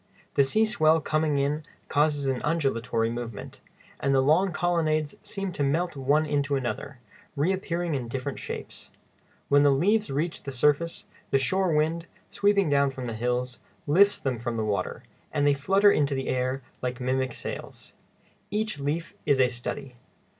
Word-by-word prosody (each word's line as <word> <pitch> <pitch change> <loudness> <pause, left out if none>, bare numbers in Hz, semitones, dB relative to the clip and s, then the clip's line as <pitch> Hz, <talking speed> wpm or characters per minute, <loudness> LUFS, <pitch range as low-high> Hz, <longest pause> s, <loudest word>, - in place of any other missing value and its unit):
The 140 - +5
sea 215 +11 +3
swell 160 -6 +3
coming 155 -1 0
in 145 +2 0 0.3
causes 145 -1 +1
an 130 -2 0
undulatory 125 -7 0
movement, 115 -3 -7 0.4
and 140 0 +1
the - - +5
long 165 +8 +3
colonnades 155 -4 0
seem 195 -1 -4
to 145 - -2
melt 165 +5 0
one 140 +3 +2
into 145 -1 0
another, 135 +1 -3 0.4
reappearing 175 +1 -1
in 130 -4 -2
different 130 +3 -4
shapes. - - -7 0.6
When 145 0 +5
the 145 - +5
leaves 205 +10 +2
reach 155 +5 -2
the 140 - -6
surface, 150 +6 +1 0.2
the - - +3
shore 170 +6 +1
wind, 165 +2 0 0.2
sweeping 200 -2 +3
down 140 -1 +3
from 130 -1 -6
the 115 - -4
hills, 125 +2 -2 0.3
lifts 200 +7 +5
them 130 -4 -2
from 120 -1 -3
the 110 - -1
water, 105 -2 -2 0.3
and 145 -2 +1
they 145 - +5
flutter 195 +9 +4
in 150 - +3
the 135 -2 -2
air 130 +1 -1 0.2
like 125 -1 -3
mimic 130 0 -1
sails. - - -7 0.6
Each 210 -5 -2
leaf 155 +4 -2
is 140 -2 +3
a 125 -1 +5
study. 125 +2 -6
145 Hz, 165 wpm, -27 LUFS, 130-165 Hz, 0.6 s, The